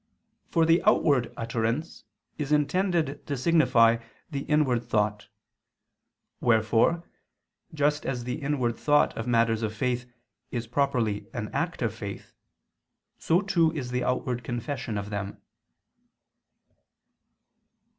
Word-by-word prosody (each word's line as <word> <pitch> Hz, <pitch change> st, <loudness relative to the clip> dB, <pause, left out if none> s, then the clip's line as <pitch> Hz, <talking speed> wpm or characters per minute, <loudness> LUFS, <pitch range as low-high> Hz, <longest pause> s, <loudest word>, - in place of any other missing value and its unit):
For 165 Hz, -2 st, +3 dB
the 165 Hz, +1 st, +4 dB
outward 135 Hz, -6 st, +3 dB
utterance 115 Hz, +6 st, -2 dB, 0.3 s
is 150 Hz, -1 st, -3 dB
intended 155 Hz, 0 st, +1 dB
to 140 Hz, -2 st, -2 dB
signify 125 Hz, -6 st, +4 dB, 0.3 s
the 140 Hz, -, -2 dB
inward 135 Hz, -6 st, +2 dB
thought. 105 Hz, -3 st, -1 dB, 1.1 s
Wherefore, 115 Hz, +8 st, +3 dB, 0.7 s
just 150 Hz, 0 st, +1 dB
as 125 Hz, -3 st, -3 dB
the 125 Hz, +5 st, -4 dB
inward 135 Hz, -5 st, -1 dB
thought 145 Hz, 0 st, +3 dB
of 115 Hz, -, -4 dB
matters 115 Hz, -2 st, +2 dB
of 110 Hz, -1 st, -2 dB
faith 125 Hz, +1 st, -1 dB, 0.4 s
is 120 Hz, -1 st, -3 dB
properly 120 Hz, -4 st, 0 dB
an -, -, -3 dB
act -, -, -2 dB
of -, -, 0 dB
faith, -, -, -8 dB, 0.9 s
so 170 Hz, +4 st, +2 dB
too 170 Hz, -5 st, +2 dB
is 130 Hz, -6 st, -4 dB
the 125 Hz, 0 st, -1 dB
outward 125 Hz, -1 st, -1 dB
confession 120 Hz, -1 st, -4 dB
of 100 Hz, +1 st, -5 dB
them. 100 Hz, 0 st, -4 dB
125 Hz, 115 wpm, -27 LUFS, 115-150 Hz, 1.1 s, the